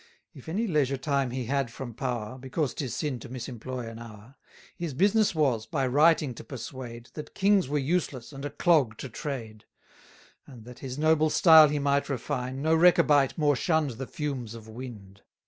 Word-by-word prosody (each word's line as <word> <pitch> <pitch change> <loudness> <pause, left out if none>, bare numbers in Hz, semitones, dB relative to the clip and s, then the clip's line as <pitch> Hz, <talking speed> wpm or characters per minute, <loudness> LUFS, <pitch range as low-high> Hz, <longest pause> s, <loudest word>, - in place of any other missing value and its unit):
If 135 +3 -11
any 205 +8 -1
leisure 145 - +1
time 140 -1 0
he 125 0 -4
had 135 0 -1
from 120 0 -8
power 125 0 -4
(Because 135 +2 -2
'tis 130 -6 -4
sin 145 -6 -2
to 115 - -10
misemploy 125 -1 -6
an 115 0 -8
hour), 115 +1 -12 0.4
His 165 -6 -5
business 205 +4 +3
was, 125 -8 +1
by 135 +1 -1
writing 145 +1 +3
to - - -10
persuade, 120 -3 -8
That 150 - -9
kings 195 -5 +3
were 150 - 0
useless 145 -3 -2
and 135 0 -8
a 145 - -3
clog 145 - +2
to 135 - -7
trade; 115 -8 -6 0.8
And, 120 -5 -13
that 125 0 -12
his 130 -1 -6
noble 155 0 +3
style 160 -1 +8
he 150 - -1
might 140 0 +1
refine, 130 +1 -3
No 160 +1 +3
Rechabite 150 -5 +4
more 145 -2 +3
shunn'd 160 0 +1
the 135 - -4
fumes 130 -7 -4
of 110 -1 -11
wind. 110 -5 -10
135 Hz, 180 wpm, -27 LUFS, 120-150 Hz, 0.8 s, style